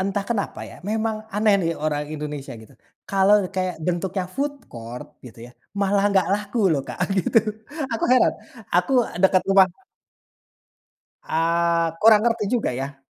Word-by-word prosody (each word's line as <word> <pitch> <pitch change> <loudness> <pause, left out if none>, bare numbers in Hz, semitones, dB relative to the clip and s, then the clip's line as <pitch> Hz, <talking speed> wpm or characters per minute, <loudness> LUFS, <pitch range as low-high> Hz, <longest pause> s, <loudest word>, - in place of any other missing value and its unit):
Entah 195 +1 -1
kenapa 215 -4 -2
ya, - - -12
memang 220 0 -1 0.2
aneh 210 0 +3
nih 165 - 0
orang 150 -1 -1
Indonesia 150 -2 -6
gitu. 110 - -17 0.4
Kalau 195 +1 +4 0.2
kayak 185 -1 -1
bentuknya 180 +1 -1
food 285 +2 -1 0.2
court 115 +1 -8 0.2
gitu 115 - -13
ya, - - -14 0.3
malah 200 0 +2
nggak 190 -2 +2
laku 210 +3 -2
loh, 140 - +1
Kak, - - -7 0.2
gitu. 190 - +3 0.5
Aku 225 - -1
heran 255 - +4 0.4
aku, 180 +9 +1
eee, - - -8
dekat 185 -1 +4
rumah 195 -1 +6 1.6
Eee, 170 +1 +1
kurang 215 -1 +7
ngerti 225 -3 0
juga 235 - 0
ya. 135 +2 -5
190 Hz, 150 wpm, -23 LUFS, 165-210 Hz, 1.6 s, kurang